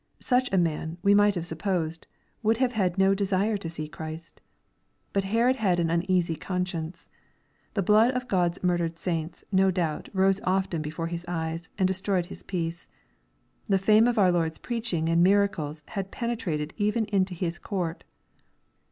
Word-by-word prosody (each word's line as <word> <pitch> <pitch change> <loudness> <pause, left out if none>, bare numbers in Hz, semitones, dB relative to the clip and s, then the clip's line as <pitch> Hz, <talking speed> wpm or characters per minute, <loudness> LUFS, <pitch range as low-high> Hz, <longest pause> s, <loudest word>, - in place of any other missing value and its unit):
Such 250 0 +1
a 195 - +2
man, 165 -1 0
we 200 0 +5
might 205 0 +5
have 170 -2 -3
supposed, 165 -1 -2 0.3
would 220 0 +2
have 255 0 +2
had 190 -5 0
no 195 0 +4
de 200 +1 -1
sire 200 +3 +1
to 175 -4 -5
see 155 -2 -5
Christ, 160 +1 -8 0.7
But 195 -1 +1
Herod 235 +6 +2
had 190 -6 +2
an 165 -1 +1
uneasy 170 -1 +1
conscience. 180 -2 -4 0.7
The 200 - +1
blood 215 +5 +5
of 250 0 -2
God's 175 -3 0
murdered 170 -2 0
saints, 165 -1 -3
no 190 0 +4
doubt, 170 -4 -2
rose 195 0 +2
often 185 -3 0
before 155 +2 -4
his 170 0 -4
eyes, 165 0 -3
and 190 -2 +3
destroyed 190 -1 0
his 180 - -10
peace. 170 -2 -4 0.8
The 195 - +4
fiime 215 +4 +5
of 240 - -1
our 190 -3 +5
Lord's 165 -2 0
preaching 225 -9 -2
and 165 +1 +3
miracles 180 -6 +1
had 195 -2 -4
penetrated 195 -12 -3
even 210 +2 +1
into 195 -3 0
his 175 0 -3
court. 180 -5 -3
185 Hz, 170 wpm, -27 LUFS, 165-200 Hz, 0.8 s, we